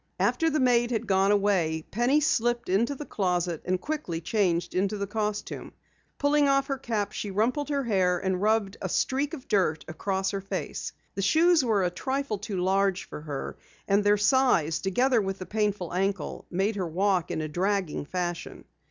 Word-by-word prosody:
After 325 -1 +2
the 305 0 0
maid 240 -2 +3
had 225 -3 -1
gone 195 +1 +3
away, 185 -6 +1
Penny 245 +7 +3
slipped 240 -5 +1
into 230 +9 +2
the 295 - -7
closet 180 - -1
and 185 0 0
quickly 235 - -3
changed 175 -1 0
into 200 +3 0
the 200 - -2
costume. 210 0 -4 0.4
Pulling 285 0 +3
off 275 0 +3
her 275 -1 -3
cap, 215 -4 -2
she 205 - -4
rumpled 240 +9 0
her 280 -2 0
hair 190 -6 +2
and 190 0 -1
rubbed 215 -2 +1
a 190 - -3
streak 280 - 0
of 265 - -13
dirt 180 -6 +1
across 190 +4 -2
her 195 -1 -3
face. 195 - -4 0.2
The 195 - -3
shoes 320 - +4
were 215 -5 +2
a 175 - 0
trifle 260 +3 -2
too 205 -1 -4
large 195 0 +1
for - - -8
her, 145 -3 -5 0.3
and 200 +1 +3
their 205 0 +4
size, 210 - +3
together 240 +5 +2
with 195 -1 -3
the 185 - -7
painful 205 -5 -1
ankle, 190 -2 -2
made 195 +4 0
her 185 -3 -1
walk 185 +1 +1
in - - -2
a 155 - -2
dragging 185 -1 -1
fashion. 175 -1 -4
200 Hz, 185 wpm, -27 LUFS, 185-240 Hz, 0.4 s, shoes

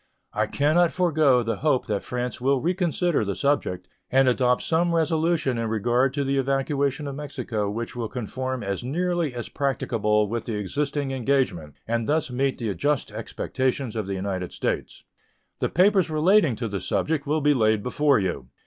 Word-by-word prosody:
I 110 +1 0
can 145 +7 +1
not 175 -1 +4
forego 155 -8 +3
the 115 -2 -2
hope 145 -1 +1
that 105 -4 -1
France 125 0 -4
will 135 +1 +2
reconsider 175 - 0
the 100 -2 -2
subject 140 -10 0 0.2
and 135 0 +4
adopt 125 0 +2
some 170 +1 +1
resolution 160 -5 +1
in 115 - -1
regard 120 +4 +2
to 145 - 0
the 135 0 0
evacuation 140 +1 0
of 140 - -4
Mexico 125 -7 -3
which 115 +4 -5
will 120 -2 -3
conform 130 +1 -4
as 100 +3 -3
nearly 170 +3 -1
as 120 - -4
practicable 105 -6 0
with 115 +2 -3
the 115 - -3
existing 140 +7 -2
engagement, 125 - 0
and 115 +1 -1
thus 155 -3 +1
meet 135 +2 0
the 110 -4 -2
just 145 +5 -1
expectations 130 -2 -2
of 110 -3 -2
the 100 - -2
United 95 -1 -3
States. - - -3 0.6
The - - 0
papers 190 0 +3
relating 160 - +3
to 115 +1 -3
the 100 -2 -3
subject 150 - -1
will 155 +2 +1
be 145 +1 +4
laid 110 -4 +2
before 145 +2 +2
you. 90 - -2
130 Hz, 175 wpm, -25 LUFS, 115-150 Hz, 0.6 s, not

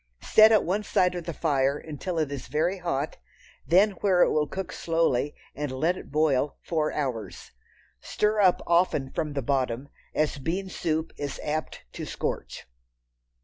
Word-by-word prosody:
Set 220 0 +7
at 215 - +5
one 195 +4 0
side 180 -3 +2
of 175 -2 -5
the 170 - -3
fire 140 -3 +1
until 160 +4 -5
it 155 -3 0
is 140 -3 -6
very 165 +7 0
hot, 155 -4 -2 0.5
then 190 +7 +5
where 185 -3 +4
it - - +2
will 150 -1 +1
cook 190 +2 -5
slowly, 155 -4 0 0.2
and 145 -2 -4
let 160 +7 +1
it - - -10
boil 150 -2 +1
four 155 -2 0
hours. 130 -7 -4 0.5
Stir 210 - 0
up 185 -2 +4
often 170 -6 +2
from 150 -2 -2
the 140 -2 -2
bottom, 130 0 -1 0.3
as 150 -2 0
bean 185 +7 -2
soup 160 -2 -2
is 145 -2 -4
apt 155 +1 -3
to - - -6
scorch. - - -4
155 Hz, 165 wpm, -27 LUFS, 140-180 Hz, 0.5 s, Set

